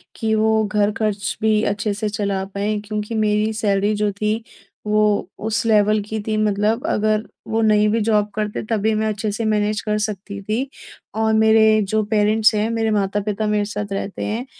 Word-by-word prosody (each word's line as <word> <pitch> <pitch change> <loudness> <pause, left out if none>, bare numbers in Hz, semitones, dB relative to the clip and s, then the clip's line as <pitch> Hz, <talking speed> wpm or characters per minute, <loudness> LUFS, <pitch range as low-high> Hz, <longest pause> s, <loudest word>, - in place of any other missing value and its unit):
कि 220 -2 -1
वो 220 0 +2
घर 210 0 +1
ख़र्च 210 -2 -1
भी 215 -1 +3
अच्छे 205 0 -2
से 210 +1 -2
चला 200 -2 -2
पाएँ। 205 +1 -1
क्योंकि 210 +1 -4
मेरी 210 +1 +1
सैलरी 205 -1 +1
जो 210 0 0
थी, 215 +3 -2 0.4
वो 210 -2 +2 0.2
उस 225 +1 -1
लेवल 215 -1 +3
की 215 +2 -5
थी 215 -1 0
मतलब 210 +4 0
अगर 215 0 0 0.2
वो 225 0 0
नहीं 210 -1 +4
भी 225 +2 +1
जॉब 210 -1 +2
करते 210 -1 -2
तभी 220 -1 +1
मैं 215 0 0
अच्छे 215 0 -2
से 230 +2 -3
मैनेज़ 210 -1 0
कर 210 0 0
सकती 200 -1 -7
थी। 220 +7 -2 0.5
और 220 0 +1
मेरे 220 -1 +5
जो 215 +2 0
पेरेंट्स 215 +1 +3
हैं, 210 +2 0
मेरे 225 -1 0
माता-पिता 205 +1 -1
मेरे 210 -1 +1
साथ 205 -1 -3
रहते 195 0 -4
हैं। 225 +4 -3
215 Hz, 185 wpm, -20 LUFS, 205-220 Hz, 0.5 s, मेरे